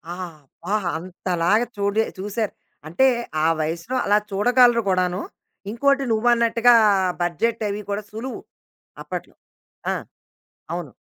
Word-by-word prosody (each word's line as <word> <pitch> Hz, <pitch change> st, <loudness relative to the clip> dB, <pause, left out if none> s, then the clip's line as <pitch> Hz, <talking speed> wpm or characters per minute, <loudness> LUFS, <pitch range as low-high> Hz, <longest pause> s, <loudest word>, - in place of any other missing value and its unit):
ఆబ్బా! 170 Hz, 0 st, -8 dB, 0.2 s
అంతలాగా 180 Hz, +4 st, 0 dB
చూడి 200 Hz, +2 st, +1 dB, 0.2 s
చూశారు. 210 Hz, +2 st, -2 dB, 0.3 s
అంటే, 175 Hz, +12 st, +2 dB, 0.4 s
ఆ -, -, +5 dB
వయసులో 170 Hz, +10 st, -3 dB
అలా 205 Hz, -, +4 dB
చూడగలరు 240 Hz, +3 st, +4 dB
గూడాను. 185 Hz, 0 st, +1 dB, 0.5 s
ఇంకోటి 275 Hz, +4 st, +2 dB
నువ్వన్నట్టుగా 235 Hz, +1 st, +4 dB, 0.5 s
బడ్జెట్ 220 Hz, +7 st, 0 dB
అవి 205 Hz, +1 st, -3 dB
కూడా 205 Hz, +1 st, -2 dB
సులువు 230 Hz, +5 st, -6 dB, 0.6 s
అప్పట్లో. -, -, -7 dB, 0.6 s
ఆ! -, -, 0 dB, 0.8 s
అవును. -, -, -5 dB
210 Hz, 105 wpm, -22 LUFS, 180-235 Hz, 0.8 s, ఆ